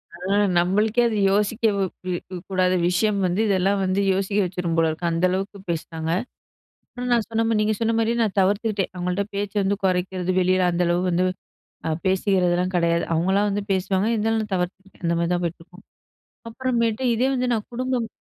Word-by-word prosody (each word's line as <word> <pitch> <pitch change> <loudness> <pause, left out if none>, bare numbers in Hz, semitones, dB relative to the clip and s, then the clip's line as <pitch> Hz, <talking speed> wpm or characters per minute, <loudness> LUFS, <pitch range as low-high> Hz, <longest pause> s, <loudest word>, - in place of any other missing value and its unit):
அ - - -11 0.4
நம்மளுக்கே 210 +7 +2
அது 220 -2 -1
யோசிக்க 210 +1 +1 0.2
கூ 185 - -5 0.4
கூடாத 185 -1 +2
விஷயம் 200 +3 +1
வந்து 180 +4 +1
இதெல்லாம் 195 0 +2
வந்து 190 +1 +1
யோசிக்க 195 +2 -1
வச்சுரும் 180 -2 -2
போல 165 -1 +3
இருக்கு. 165 +2 -2
அந்த 165 +2 +1
அளவுக்கு 195 +2 -3
பேசுனாங்க. 160 -1 -3 0.8
ஆனா, 245 - -5
நான் 235 -3 +3
சொன்ன 225 0 0
மாதிரி, 225 -2 +1
நீங்க 215 +1 +2
சொன்ன 230 0 +1
மாரியே 230 +1 +1
நான் 210 -3 -1
தவிர்த்துக்கிட்டேன். 200 +1 +1
அவுங்கள்ட்ட 180 +2 -1
பேச்ச 200 0 -3
வந்து 195 +1 +1
குறைக்கிறது 185 0 0
வெளில 185 0 +2
அந்த 175 +1 +1
அளவு 175 +1 +1
வந்து 180 +1 +1 0.6
அ - - 0 0.2
பேசிக்கிறதெல்லாம் 185 -1 +1
கிடையாது. 170 -1 +2
அவுங்களா 190 +5 +2
வந்து 205 +1 -1
பேசுவாங்க. 190 +1 0
இருந்தாலும் 225 0 +1
நான் 210 -2 -8
தவிர்த்து 190 +2 -5
அந்தமாரி 170 0 0
தான் 175 - -1
போயிட்டுருக்கும். 175 +3 -7 0.7
அப்புறமேட்டு 235 -1 -1
இதே 250 +4 +2
வந்து 255 -1 0
நான் 215 -2 -2
குடும்பம் 250 -1 -1
190 Hz, 170 wpm, -23 LUFS, 180-215 Hz, 0.8 s, போல